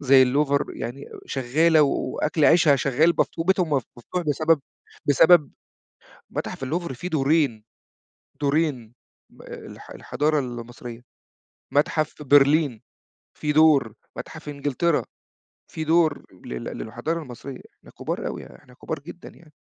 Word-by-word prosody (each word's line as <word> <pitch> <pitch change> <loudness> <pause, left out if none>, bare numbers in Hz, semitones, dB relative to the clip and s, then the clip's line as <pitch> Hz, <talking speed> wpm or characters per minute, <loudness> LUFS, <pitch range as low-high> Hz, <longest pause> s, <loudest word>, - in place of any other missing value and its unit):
زي 135 -1 +6
اللوفر 140 +2 +2
يعني 120 +4 -6 0.2
شغالة 150 +5 +3
وأكل 150 +2 0
عيشها 165 -4 +5
شغّال 140 +6 +2
مف - - +3
وبيتهُم 180 0 +1
مف 135 -4 +1
مفتوح 180 +9 -4
بسبب 155 +1 +2 0.5
بسبب 150 +2 +5 0.8
متاحف - - -5
اللوفر 160 +1 -3
في 175 +9 -6
دورين، 140 -7 +1 0.8
دورين 140 -6 0 0.4
م - - -17
آآ، - - -9
الح - - -12
الحضارة 150 +1 -1
المصرية، 120 -1 -7 0.7
متحف 155 +1 0
برلين 145 -3 +4 0.6
في 150 -1 -1
دور، 150 -8 +4 0.2
متحف 160 -1 -8
إنجلترا 145 +3 0 0.7
في 160 - -4
دور 160 -2 +2 0.2
لل 60 -1 -6
للحضارة 155 +9 -4
المصرية، 130 0 -9 0.2
إحنا - - -17
كبار - - -3
أوي - - -5
يا 60 - -13
إحنا 125 - -20
كبار 155 +5 -5
جدًا، 170 +4 -11
يعني 155 -3 -19
145 Hz, 130 wpm, -24 LUFS, 130-160 Hz, 0.8 s, زي